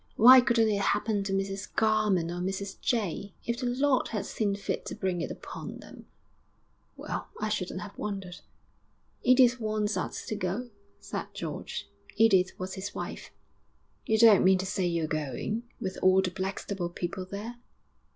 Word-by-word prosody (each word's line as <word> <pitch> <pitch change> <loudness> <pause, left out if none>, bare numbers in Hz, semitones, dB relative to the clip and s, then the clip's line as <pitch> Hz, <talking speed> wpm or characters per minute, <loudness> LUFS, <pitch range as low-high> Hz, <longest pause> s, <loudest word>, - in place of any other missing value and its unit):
Why 255 +3 +9
couldn't 230 -2 +3
it 200 -1 0
happen 205 0 +1
to 195 - -2
Mrs 195 0 -3
Garman 215 -6 +2
or 175 0 -4
Mrs 195 +1 -4
Jay? 205 -4 -1
If 235 0 -1
the 250 - -1
Lord 260 +2 +2
had 210 -4 -3
seen 205 -3 -1
fit 200 - -3
to - - -4
bring 190 -4 -1
it - - -3
upon - - -7
them - - -13 0.9
well, - - -5
I 215 +1 -1
shouldn't 185 -2 -2
have 205 0 -9
wondered.' 195 -4 -5 0.8
'Edith 255 -1 +5
wants 215 -1 -1
us - - -4
to 215 - -3
go,' 210 +5 -3 0.3
said - - -5
George - - -5 0.3
Edith 190 -4 +4
was 185 +1 -5
his 195 +1 -6
wife. - - -6 0.8
'You 220 - +3
don't 220 -3 +7
mean 190 0 +6
to 185 - -3
say 190 -1 0
you're 170 -2 0
going, 155 - -3
with 190 -1 -4
all 185 0 +5
the 185 - -1
Blackstable 190 -1 -3
people 175 +2 -4
there?' 210 +5 -6
200 Hz, 165 wpm, -29 LUFS, 185-220 Hz, 0.9 s, Why